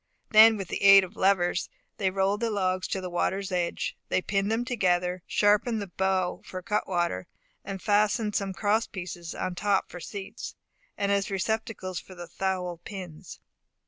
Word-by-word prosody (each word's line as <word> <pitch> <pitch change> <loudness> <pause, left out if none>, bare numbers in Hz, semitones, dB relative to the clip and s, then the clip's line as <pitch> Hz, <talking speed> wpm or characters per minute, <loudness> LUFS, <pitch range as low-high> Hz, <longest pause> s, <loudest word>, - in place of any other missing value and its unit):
Then 220 +1 +8
with 195 -3 -6
the - - -3
aid 195 0 +9
of 185 +3 -8
levers, 185 -2 +2 0.3
they 195 -2 +1
rolled 195 +2 +1
the 230 0 0
logs 185 -3 0
to 190 - -2
the 185 - -4
water's 190 +2 -1
edge; 175 -2 -1
they - - +2
pinned 195 +2 -1
them 230 +2 0
together, 180 -6 +1
sharpened 210 +2 +2
the 205 - -3
bow 190 -1 0
for 185 - -8
a 185 - -6
cutwater, 175 - -1 0.4
and 195 -1 -5
fastened 210 +1 +2
some 195 -1 0
cross 210 +3 +1
pieces 175 -2 -7
on 185 - -3
top 200 +1 0
for 180 - -7
seats, 195 +3 -7 0.4
and 200 0 0
as 200 -1 +1
receptacles 195 -2 -2
for 185 - -13
the 175 -1 -7
thowl 180 -1 -3
pins. 185 -6 -9
195 Hz, 175 wpm, -27 LUFS, 185-205 Hz, 0.4 s, aid